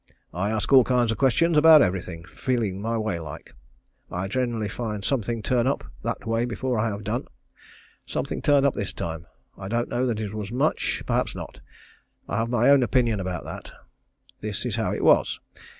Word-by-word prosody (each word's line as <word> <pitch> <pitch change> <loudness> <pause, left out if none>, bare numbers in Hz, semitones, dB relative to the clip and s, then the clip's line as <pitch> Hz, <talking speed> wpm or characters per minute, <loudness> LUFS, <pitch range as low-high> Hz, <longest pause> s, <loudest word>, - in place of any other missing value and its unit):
I 90 +5 -1
ask 110 +4 -1
all 130 -2 +9
kinds 120 -2 +2
of 115 - -4
questions 145 +6 +3
about 155 -1 +8
every 95 0 0
thing, 85 -2 -9
feeling 100 +1 -2
my 115 +2 -1
way 110 -6 -2
like. 75 -3 -9 0.6
I 90 +2 -3
generally 120 -1 -1
find 105 -1 -4
something 115 -4 -1
turn 125 -1 +1
up 140 - 0 0.2
that - - -4
way 115 +1 0
before 125 0 -2
I 115 - +1
have 100 0 -5
done. 115 +6 -2 0.8
Something - - -3
turned 140 -1 +4
up 140 - +3
this 100 - -4
time. 85 +1 -5 0.3
I 95 - -6
don't 120 +3 -1
know 125 +1 0
that 115 -3 -1
it 105 -2 -4
was 105 -1 -5
much 135 +6 0
perhaps - - 0
not. - - -8 0.7
I 105 - -2
have 115 +1 0
my 120 +2 +4
own 140 -1 +6
opinion 120 -3 +2
about 90 -2 -4
that. - - -8 0.7
This 105 +1 -4
is 120 -4 -2
how 115 -2 -1
it - - -3
was. - - +4
115 Hz, 195 wpm, -25 LUFS, 100-125 Hz, 0.8 s, all